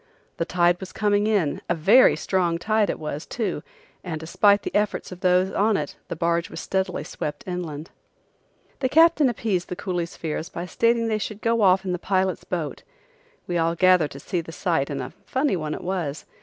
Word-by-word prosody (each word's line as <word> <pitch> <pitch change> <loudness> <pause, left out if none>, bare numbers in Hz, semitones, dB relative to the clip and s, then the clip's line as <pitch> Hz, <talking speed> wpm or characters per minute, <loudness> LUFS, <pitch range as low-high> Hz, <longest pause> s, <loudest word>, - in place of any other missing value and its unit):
The 165 - -1
tide 175 0 +2
was 190 - -9
coming 205 -1 +1
in, 195 -10 +1
a 175 - +2
very 205 +11 +6
strong 175 -3 0
tide 215 +3 +1
it - - -1
was, 150 0 -5
too, 200 -10 -2 0.4
and 160 -4 -4
despite 200 +5 +3
the - - -5
efforts 205 -2 0
of 180 - -8
those 185 +1 +3
on 210 +1 +2
it 145 - -4
the - - -4
barge 170 +1 0
was - - -7
steadily 190 -1 -2
swept 150 -1 -5
inland. 170 -4 -5 0.9
The 260 - 0
captain 320 -2 +5
appeased 205 -6 -2
the 180 - -3
coolies' 175 -2 -3
fears 160 0 -4
by 170 - -5
stating 230 +5 +2
that 225 - -1
they 215 - +1
should 215 0 -5
go 230 0 +2
off 190 -1 +4
in 185 - -1
the 180 - -2
pilot's 190 -1 0
boat. 165 -5 -4 0.6
We 175 -1 -1
all 165 +1 +1
gathered 180 -3 +4
to 140 - -10
see 175 +4 -2
the 165 - -10
sight 165 -5 0
and 140 - -3
a - - -8
funny 265 -3 +1
one 155 -3 -3
it - - -8
was! 175 -6 -3
180 Hz, 205 wpm, -24 LUFS, 165-205 Hz, 0.9 s, very